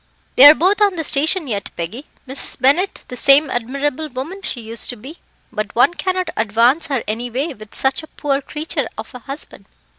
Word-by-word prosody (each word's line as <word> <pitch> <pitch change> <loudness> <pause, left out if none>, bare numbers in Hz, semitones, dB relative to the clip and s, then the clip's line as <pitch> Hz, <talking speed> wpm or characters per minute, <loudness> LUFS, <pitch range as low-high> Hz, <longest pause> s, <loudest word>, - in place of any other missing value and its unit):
"They 265 - +9
are 295 +2 +11
both 385 +6 +2
on 405 -3 +4
the 325 - -3
station 315 +5 +2
yet, 205 -7 -4
Peggy; 200 - -6 0.2
Mrs. 265 +2 -5
Bennett 305 +9 +2
the 250 - -6
same 275 +3 +5
admirable 275 +5 -2
woman 285 +10 -6
she 265 - -5
used 225 0 -5
to 245 - -5
be, 265 +9 -12 0.3
but 215 -1 -4
one 245 +8 +4
cannot 365 +2 -2
advance 230 +9 +2
her 270 -5 -1
any 230 +3 -3
way 275 +7 -3
with 215 -3 -14
such 265 +2 0
a 315 - -12
poor 280 -2 -2
creature 305 +3 -3
of - - -8
a 250 - -8
husband. 275 +5 -8
275 Hz, 200 wpm, -19 LUFS, 240-315 Hz, 0.3 s, are